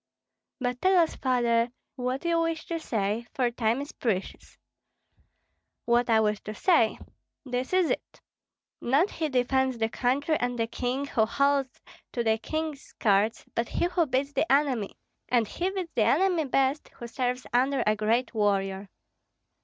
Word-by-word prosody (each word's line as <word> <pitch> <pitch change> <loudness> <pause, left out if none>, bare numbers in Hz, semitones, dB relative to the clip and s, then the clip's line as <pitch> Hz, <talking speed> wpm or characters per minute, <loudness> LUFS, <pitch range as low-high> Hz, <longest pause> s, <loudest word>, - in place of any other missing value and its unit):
"But 250 -1 -2
tell 375 0 +4
us, 335 -2 +3
Father, 240 -2 +1 0.3
what 255 +3 -3
you 335 -1 +2
wish 330 -1 -2
to 335 -1 -3
say, 220 -4 -2
for 245 -2 +1
time 235 +2 0
is 285 - -7
precious." 200 -6 -4 1.3
"What 240 +1 +2
I 225 -1 +5
wish 210 -1 +1
to 215 - -5
say? 235 - +3 0.5
This 250 0 -3
is 370 -3 +3
it: - - -4 0.6
not 285 +11 +2
he 315 -2 -2
defends 260 0 +1
the 225 -1 0
country 280 +6 0
and 245 0 -1
the 230 - +1
king 250 +4 -2
who 220 -6 +1
holds 280 +1 +1 0.3
to 240 - -1
the 220 -1 +2
king's 310 +2 -3
skirts, 210 0 0
but 230 0 -1
he - - 0
who 350 -2 +1
beats 275 +2 -1
the 280 +3 0
enemy; 270 -7 +1 0.3
and 235 -3 +2
he 360 - -2
beats 375 -3 -4
the 235 - +1
enemy 335 - +2
best 270 +2 +1
who 235 - -8
serves 250 +1 -2
under 265 +3 +2
a 215 - +3
great 225 +4 0
warrior. 195 -2 0
250 Hz, 160 wpm, -27 LUFS, 230-285 Hz, 1.3 s, I